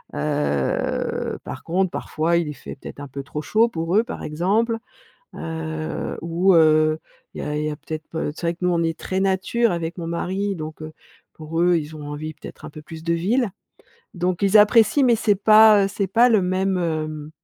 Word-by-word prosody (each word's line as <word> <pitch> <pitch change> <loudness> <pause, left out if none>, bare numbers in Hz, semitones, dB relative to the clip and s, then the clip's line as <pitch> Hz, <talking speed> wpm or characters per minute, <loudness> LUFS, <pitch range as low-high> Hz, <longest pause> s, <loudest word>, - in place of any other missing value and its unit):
Heu, 145 - -1
par - - -8
contre, 185 +2 0
parfois, 165 +2 0
il 160 -3 -1
fait 125 - -9
peut-être - - -10
un 145 - -7
peu 140 +1 -6
trop 150 +2 -5
chaud 220 +10 +3
pour 165 -1 -1
eux 220 - +4
par 240 - -7
exemple, 205 +9 0 0.6
heu, 160 -1 -4
ou, 175 +3 +2
heu, 155 -1 +4 0.3
il - - -6
y - - -3
a 150 0 -3
il 150 - -2
y - - -1
a 150 - -5
peut-être, 155 +1 -7
p 160 - -3
heu, 150 - -2
c'est - - -10
vrai - - +1
que - - -29
nous - - +3
on 170 -1 +1
est 165 0 -1
très 190 - -3
nature 195 +4 +1
avec 170 0 -4
mon 170 - -4
mari. 190 +4 -2
Donc 155 -1 -7
heu, 155 0 -7 0.4
pour 160 +1 -4
eux, 175 0 +4
ils 155 0 -7
ont 150 -1 -8
envie, 155 +2 -6
peut-être 155 - -12
un - - -8
peu 155 +1 -11
plus 160 +1 -10
de 170 0 +1
ville. 210 +7 +1 0.6
Donc 180 0 -1
ils 200 +2 +5
apprécient, 220 +6 +5
mais 240 -2 +4
c'est 215 -1 +2
pas, 215 0 +7
heu, - - -3
c'est 200 0 -2
pas 235 +6 +5
le 215 -4 +4
même, 185 +1 0
hem, 155 -3 -3
170 Hz, 215 wpm, -22 LUFS, 155-195 Hz, 0.6 s, pas